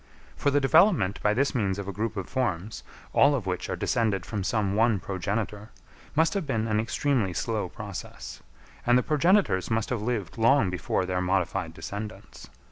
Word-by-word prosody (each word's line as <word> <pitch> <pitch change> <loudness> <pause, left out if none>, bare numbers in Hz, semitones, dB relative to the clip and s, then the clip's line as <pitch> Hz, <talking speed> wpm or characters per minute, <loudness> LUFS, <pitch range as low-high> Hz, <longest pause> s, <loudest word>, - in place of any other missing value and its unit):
For - - +1
the 145 +1 +3
development 145 - +4
by 105 0 +2
this 140 +3 +1
means 100 -7 0
of 100 -1 -5
a 100 - -4
group 110 +2 -3
of 95 - -4
forms, 110 -5 -2 0.3
all 140 +1 +5
of 120 -7 -3
which 90 -1 -3
are - - -1
descended 105 -6 0
from 105 -4 -3
some 100 -1 0
one 110 -1 +3
progenitor, 100 +3 -3 0.5
must 160 +2 +3
have 195 -7 -2
been 115 -5 0
an 105 -1 +1
extremely 120 -3 0
slow 110 -2 -2
process; 100 0 -8 0.4
and 120 0 +4
the 125 - +2
progenitors 150 - +2
must 115 +1 -1
have 120 -4 -1
lived 110 -4 -3
long 115 -4 +4
before 90 +1 -1
their 90 0 -1
modified 90 -2 -1
descendants. 105 +4 -8
110 Hz, 180 wpm, -27 LUFS, 95-125 Hz, 0.5 s, all